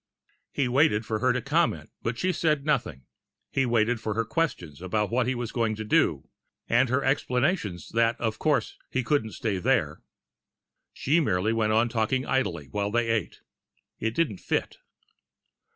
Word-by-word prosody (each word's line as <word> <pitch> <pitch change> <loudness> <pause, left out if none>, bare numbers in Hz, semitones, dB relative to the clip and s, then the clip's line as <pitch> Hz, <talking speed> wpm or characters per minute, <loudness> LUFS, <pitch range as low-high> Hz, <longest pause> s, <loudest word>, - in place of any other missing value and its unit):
He 140 - 0
waited 125 -4 +3
for 110 0 -2
her 130 +3 +3
to 125 -1 -1
comment, 160 +4 0
but 115 +1 -2
she 185 +6 0
said 150 -4 +1
nothing. 110 - -1 0.5
He 135 -2 +1
waited 115 0 +2
for 110 -2 -2
her 115 0 0
questions 110 - -2
about 105 +3 -1
what 120 0 +1
he 130 - 0
was 120 -2 -4
going 115 -2 0
to 110 - -5
do, 105 - +1 0.4
and 130 0 +3
her 130 +3 +1
explanations 125 - 0
that 115 0 +1
of 110 -2 -2
course 150 -2 0
he 130 - -1
couldn't 120 -6 0
stay 105 -5 -2
there. - - +1 0.9
She 155 +5 +1
merely 105 - +1
went 110 -1 +1
on 115 +2 +3
talking 120 +3 0
idly, 95 - -1
while 100 +4 -1
they 115 +1 +1
ate. 110 -5 -2 0.6
It 110 0 -2
didn't 120 - 0
fit. - - -2
115 Hz, 170 wpm, -27 LUFS, 110-135 Hz, 0.9 s, waited